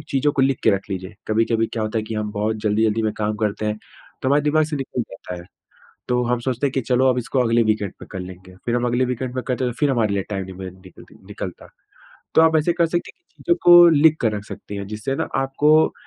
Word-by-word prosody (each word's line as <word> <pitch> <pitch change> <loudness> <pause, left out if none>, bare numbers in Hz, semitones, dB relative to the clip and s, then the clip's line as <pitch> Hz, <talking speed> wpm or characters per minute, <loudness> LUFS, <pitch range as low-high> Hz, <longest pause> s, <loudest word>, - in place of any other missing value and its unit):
चीज़ों 140 +2 +1
को 135 - +1
लिख 135 -1 +2
के - - +6
रख 100 -1 0
लीजिए। 95 +1 -5
कभी-कभी 115 +1 +1
क्या 110 - -2
होता 110 +1 -1
है - - -2
कि 110 - -5
हम 105 -1 -2
बहुत 105 +1 -1
जल्दी-जल्दी 110 +1 +1
में 110 -1 0
काम 105 0 0
करते 105 0 -2
हैं, 105 0 -2 0.4
तो 130 - +1
हमारे 145 +2 +3
दिमाग 155 +1 +3
से 150 0 -4
निकल 130 -2 -3
जाता 95 -1 -8
है। 85 - -9 0.7
तो 125 0 +1
हम 125 +1 0
सोचते 130 +2 -1
हैं 135 - -2
कि 135 - 0
चलो, 130 +1 +2
अब 125 - 0
इसको 130 +2 -1
अगले 115 0 +3
वीकेंड 110 -3 0
पे - - -10
कर 95 - -5
लेंगे। 90 0 -10
फिर 120 - 0
हम 120 0 0
अगले 120 +2 +1
वीकेंड 125 0 -3
में 130 - -2
कर 125 - -1
रहे 130 - 0
हैं, 125 - -1
तो - - -19
फिर 145 -2 +3
हमारे 115 -5 +1
लिए 100 - 0
टाइम 95 -2 -2
नहीं 95 0 -9
मि 95 -1 -6
निकलती 90 - -15
निकलता। - - -7 0.7
तो - - +6
आप 160 0 +4
ऐसे 155 +3 +2
कर 170 -1 +2
सकती 175 +1 -2
हैं 370 - -44
कि - - -38
चीजों 345 - +3
को 175 0 +9
लिख 155 0 +5
कर 110 -2 +1
रख 100 - -7
सकती 100 - -8
हैं। 100 -1 -5
जिससे 110 +5 -3
ना - - -2
आपको 150 +4 +3
120 Hz, 270 wpm, -21 LUFS, 105-135 Hz, 0.7 s, को